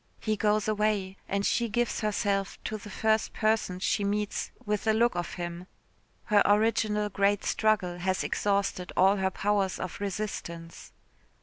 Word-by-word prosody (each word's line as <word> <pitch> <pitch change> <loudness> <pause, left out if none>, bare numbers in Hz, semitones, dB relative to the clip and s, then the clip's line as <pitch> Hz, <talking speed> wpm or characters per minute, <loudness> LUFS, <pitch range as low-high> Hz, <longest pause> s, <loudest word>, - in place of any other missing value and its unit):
He 215 -1 0
goes 210 0 +1
away 210 -3 0
and 200 0 0
she 235 -1 +1
gives 240 +3 0
herself 200 -2 -1
to 215 - -3
the 210 - -10
first 220 +2 +1
person 215 -4 +1
she 200 +2 0
meets 205 +1 -1 0.2
with 210 0 -1
a 220 - +5
look 235 +2 +3
of 175 -1 -4
him. 175 0 -5 0.6
Her 210 -2 +4
original 210 0 +2
great 200 0 +1
struggle 200 -5 +1
has 185 +1 0
exhausted 200 -3 -1
all 195 +2 +5
her 190 0 +1
powers 200 0 0
of 185 - -5
resistance. 180 -4 -5
205 Hz, 150 wpm, -28 LUFS, 190-215 Hz, 0.6 s, a